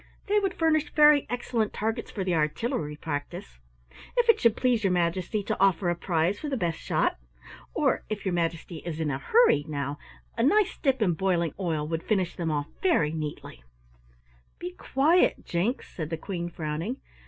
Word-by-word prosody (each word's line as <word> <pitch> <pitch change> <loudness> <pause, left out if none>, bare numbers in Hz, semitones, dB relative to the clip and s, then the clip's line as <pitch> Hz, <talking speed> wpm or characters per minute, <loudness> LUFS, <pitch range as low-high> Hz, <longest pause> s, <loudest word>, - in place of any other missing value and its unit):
They 420 +1 +3
would 390 -3 -1
furnish 310 -2 +2
very 300 -1 +6
excellent 240 -3 -1
targets 225 +2 -2
for 195 - -4
the 185 -1 0
artillery 150 0 -1
practise? 145 - -6 0.6
If 475 -1 +3
it 460 - +6
should 230 -2 +3
please 245 -4 +2
your 195 - +3
Majesty 180 +4 0
to - - -3
offer 190 -2 +3
a - - -1
prize 175 +2 0
for 300 - -4
the 270 - -1
best 170 -6 -1
shot? - - 0 0.6
Or, - - +1
if 215 -2 -4
your 190 - 0
Majesty 165 0 -2
is 160 0 -6
in 155 -2 0
a 135 - -2
hurry, 450 - +4
now, 145 -1 -3 0.4
a 230 - -1
nice 390 - +3
dip 265 -5 +2
in 180 -4 +2
boiling 170 -2 0
oil 160 -5 -1
would 165 0 -2
finish 190 -4 0
them 170 -2 -2
off 145 -2 -1 0.2
very 330 - +3
neatly!" 150 - -6 1.0
"Be 180 - -5
quiet, 295 - +2
Jinks," 190 +10 -1
said 155 -3 -4
the 165 - -3
Queen 175 -1 -4
frowning. 165 - -4
180 Hz, 180 wpm, -27 LUFS, 160-245 Hz, 1.0 s, very